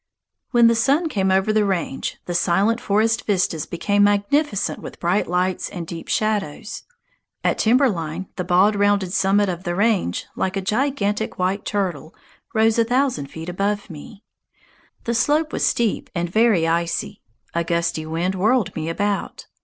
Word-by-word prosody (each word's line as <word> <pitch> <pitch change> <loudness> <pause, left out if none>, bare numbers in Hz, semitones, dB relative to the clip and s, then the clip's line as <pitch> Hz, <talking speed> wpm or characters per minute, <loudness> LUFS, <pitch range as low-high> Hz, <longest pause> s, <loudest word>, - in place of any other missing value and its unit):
When 240 -2 +4
the 230 - +6
sun 280 +8 +2
came 190 -7 0
over 190 +3 +2
the 215 -1 +3
range, 180 -8 -2
the 175 - -4
silent 195 +7 +2
forest 220 +3 +1
vistas 180 -6 0
became 205 +4 +1
magnificent 205 +4 +1
with - - -10
bright 180 +4 +1
lights 180 +1 -1
and 175 -3 -6
deep 165 0 -8
shadows. 215 -2 -2 0.6
At - - +1
timber 255 +5 +4
line 170 -3 -3
the 180 - -3
bald 185 +4 +3
rounded 200 -2 +1
summit 205 0 +3
of 180 -1 -4
the 175 -2 -2
range, 200 - +1
like 190 +1 -1
a - - -1
gigantic 220 -1 -1
white 185 +2 -1
turtle, 180 -7 -3 0.4
rose 220 +1 +3
a - - +5
thousand 245 - 0
feet 160 +3 -9
above 200 +2 -2
me. 180 +7 -11 0.8
The 235 - -1
slope 300 +6 +1
was - - -1
steep 235 -3 0
and 175 0 -1
very 205 -3 +3
icy; 170 0 -1 0.3
a 170 - 0
gusty 170 -2 -1
wind 170 +4 -1
whirled 210 +1 +1
me 160 0 -3
about. 200 +4 -2
200 Hz, 160 wpm, -21 LUFS, 175-220 Hz, 0.8 s, the